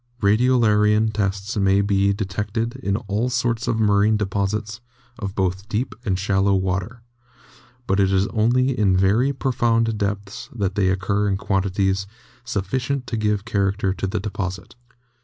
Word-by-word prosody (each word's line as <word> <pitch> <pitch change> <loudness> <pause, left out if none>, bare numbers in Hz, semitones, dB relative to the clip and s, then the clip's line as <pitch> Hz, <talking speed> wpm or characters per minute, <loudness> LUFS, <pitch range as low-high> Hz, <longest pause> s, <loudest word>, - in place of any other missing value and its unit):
Radiolarian 110 -1 +3
tests 100 0 -2
may 100 -1 +3
be 100 0 +2
detected 105 +4 -3
in 100 -7 -1
all 110 +1 -2
sorts 120 -1 -1
of 115 - 0
marine 105 0 +3
deposits 105 +2 -2 0.4
of 100 -3 -5
both 95 +2 -1
deep 120 +4 -2
and 95 -5 0
shallow 95 +1 +2
water, 95 +5 -2 0.8
but 95 -2 +1
it 95 -1 +3
is 95 0 +3
only 125 +4 +2
in 100 -5 +2
very 105 +9 +3
pro 135 -1 -2
found 115 -2 +1
depths 100 0 -4
that 100 -4 -1
they 95 -2 +1
occur 100 +2 0
in 95 - 0
quantity 95 0 0 0.5
sufficient 125 +5 -2
to 115 - -4
give 105 -1 0
character 100 -2 0
to 95 - -3
the 95 - -2
deposit. 95 -2 -5
100 Hz, 150 wpm, -22 LUFS, 95-115 Hz, 0.8 s, Radiolarian